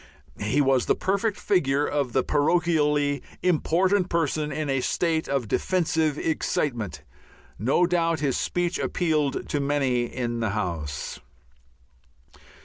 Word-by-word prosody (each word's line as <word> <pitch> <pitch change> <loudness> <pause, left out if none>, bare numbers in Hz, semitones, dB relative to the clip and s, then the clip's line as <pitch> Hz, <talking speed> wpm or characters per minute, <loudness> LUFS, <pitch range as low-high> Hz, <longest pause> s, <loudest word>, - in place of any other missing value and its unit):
He 105 +8 +1
was 135 -2 +2
the - - +3
perfect 200 +2 0
figure 145 -7 +1
of 140 -4 -1
the 130 +2 +1
parochially 150 -3 +2 0.2
important 185 +2 +2
person 155 -2 0
in 155 -1 -3
a 135 -2 0
state 160 +3 0
of 135 -5 -1
defensive 160 - 0
excitement. 120 - -2 0.6
No 135 - +3
doubt 165 -2 +1
his 140 -3 0
speech 175 0 -1
appealed 155 -5 0
to 145 - -1
many 140 -4 +1
in 120 -1 -3
the 110 -2 0
House. 80 -8 -4
150 Hz, 125 wpm, -25 LUFS, 130-170 Hz, 0.6 s, the